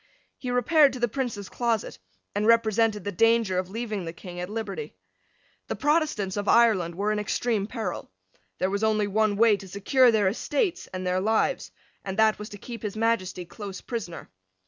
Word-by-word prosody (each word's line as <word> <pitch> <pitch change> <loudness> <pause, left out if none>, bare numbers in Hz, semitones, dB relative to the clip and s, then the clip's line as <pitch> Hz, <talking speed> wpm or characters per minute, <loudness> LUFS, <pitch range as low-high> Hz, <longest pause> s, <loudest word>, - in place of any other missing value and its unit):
He 255 - -5
repaired 275 +3 +4
to 255 - -6
the 240 - +2
Prince's 230 -5 -4
closet, 230 - -2 0.3
and 210 +1 0
represented 225 -2 +3
the 205 - -3
danger 225 -1 +3
of 185 0 -4
leaving 215 -2 -4
the 165 - -5
King 175 +1 -9
at 180 +1 -4
liberty. 225 - -5 0.7
The - - -3
Protestants 295 - 0
of 205 0 -3
Ireland 200 -8 +4
were 205 +3 0
in 215 - 0
extreme 210 0 -1
peril. 225 -1 -5 0.5
There 185 +1 0
was 200 +2 -1
only 215 -1 +2
one 210 +1 +1
way 220 0 +5
to 195 - -11
secure 240 +7 +3
their 210 -3 +2
estates 290 - -1
and 185 0 -6
their 180 0 +1
lives; 220 - +1 0.3
and 190 0 -5
that 220 -1 +4
was 210 - -7
to 205 - -9
keep 230 +2 -8
His 210 -1 -5
Majesty 195 -6 0
close 195 +1 -8
prisoner. 220 -8 -6
215 Hz, 185 wpm, -26 LUFS, 195-230 Hz, 0.7 s, way